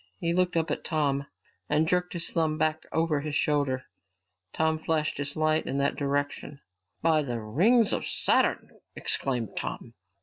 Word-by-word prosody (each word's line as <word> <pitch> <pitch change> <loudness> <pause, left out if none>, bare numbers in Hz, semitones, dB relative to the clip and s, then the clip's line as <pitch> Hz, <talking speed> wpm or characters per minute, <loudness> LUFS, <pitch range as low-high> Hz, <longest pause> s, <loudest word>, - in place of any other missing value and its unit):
He 170 -3 0
looked 180 -1 +1
up 160 -2 0
at - - -2
Tom 140 -3 0 0.4
and 155 +2 +2
jerked 180 +1 0
his 170 -1 -1
thumb 160 -2 +1
back 155 0 0
over 160 -2 +1
his 150 +1 -4
shoulder. 140 -4 +1 0.7
Tom 160 0 +1
flashed 155 -2 -1
his 145 0 -4
light 155 0 +1
in 135 - -2
that 140 0 +1
direction. 145 0 -2 0.4
"By 160 -2 +4
the 120 -5 -3
rings 195 - +3
of - - -2
Saturn!" - - +1 0.2
exclaimed 125 -6 -1
Tom. 115 - -5
155 Hz, 160 wpm, -28 LUFS, 140-165 Hz, 0.7 s, By